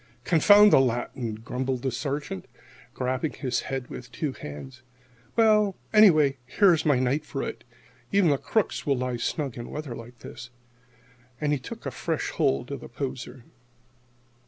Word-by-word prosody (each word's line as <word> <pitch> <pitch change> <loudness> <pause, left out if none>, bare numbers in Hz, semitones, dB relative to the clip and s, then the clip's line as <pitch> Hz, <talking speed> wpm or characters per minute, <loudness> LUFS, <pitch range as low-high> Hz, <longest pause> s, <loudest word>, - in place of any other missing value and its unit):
"Confound 205 +5 +6
the - - +8
Latin!" 120 -2 -1
grumbled 125 +3 -3
the 130 - 0
Sergeant, 135 - -4 0.5
grabbing 130 +4 -1
his 130 -4 -2
head 135 -2 -4
in - - -8
his 120 -1 -11
two 140 +4 -3
hands. 125 - -9 0.5
"Well 215 -3 +4 0.2
anyway, 155 -10 +6
here's 170 -2 +3
my 145 -3 +4
night 130 +4 0
for 140 -2 -4
it. 115 - -6 0.5
Even 195 -6 +4
the 140 - +1
crooks 220 -3 -1
will 140 -3 +1
lie 125 -1 -2
snug 135 +2 -3
in 120 - -7
weather 150 -5 -5
like 115 +1 -11
this." 120 - -10 0.9
And 150 -1 +1
he 145 - 0
took 125 - -9
a - - -2
fresh - - -3
hold 70 - 0
on 140 - -4
the - - -11
poser. 130 0 -6
135 Hz, 160 wpm, -26 LUFS, 125-155 Hz, 0.9 s, the